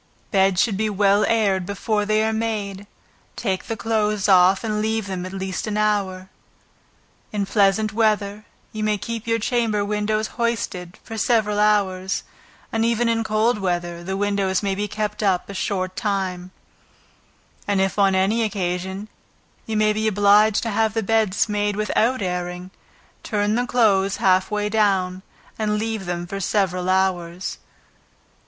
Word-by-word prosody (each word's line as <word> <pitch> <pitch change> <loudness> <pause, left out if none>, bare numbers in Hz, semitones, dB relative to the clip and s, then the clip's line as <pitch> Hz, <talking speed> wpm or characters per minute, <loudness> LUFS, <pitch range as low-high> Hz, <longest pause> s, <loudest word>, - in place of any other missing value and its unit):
Beds 190 -2 +3
should 205 -2 +2
be 215 +1 0
well 200 0 +3
aired 200 -5 +2
before 205 +2 -2
they 215 0 +2
are 220 0 0
made, 205 -3 -3 0.5
take 190 -4 -2
the 225 - -4
clothes 210 -1 0
off, 190 +1 +5
and 215 -1 -1
leave 220 -1 -1
them 185 -2 -4
at - - -8
least 190 +1 -4
an 210 0 -2
hour. 200 -3 0 1.0
In 205 -2 -1
pleasant 205 +1 +2
weather, 210 -2 +1 0.3
you 215 0 -4
may 215 -1 +1
keep 230 +2 -5 0.2
chamber 225 -5 +1
windows 210 +1 0 0.2
hoisted, 195 -6 -2
for 225 -1 -6
several 210 -3 +2
hours, 195 -3 +1 0.5
and 225 0 0
even 235 +1 +1
in 230 0 +1
cold 215 +1 +1
weather, 175 -2 -2
the 190 +2 -3
windows 200 -1 0
may 195 -1 0
be 205 +2 -2
kept 210 +1 -3
up 190 -4 +1
a 200 - -7
short 185 -1 -2
time, 190 -4 -2 1.2
and 200 -1 +1
if 195 +1 0
on 195 -1 +4
any 195 +5 +2
occasion, 190 -1 -2 0.6
you 220 -1 -1
may 215 0 +3
be 215 +1 -1
obliged 205 +1 +4
to 225 - -2
have 220 +1 +1
the 225 - 0
beds 215 -1 +2
made 205 -1 -1
without 215 +3 +1
airing, 180 0 -4 0.5
turn 210 -1 0
the 245 +2 0
clothes 200 -5 +2
half 185 0 +3
way 210 -1 -1
down, 195 -4 +1 0.4
and 210 -1 0
leave 220 -3 -3
them 175 0 -3
for 195 +2 -5
several 185 -2 0
hours. 185 -1 -1
205 Hz, 155 wpm, -22 LUFS, 190-215 Hz, 1.2 s, off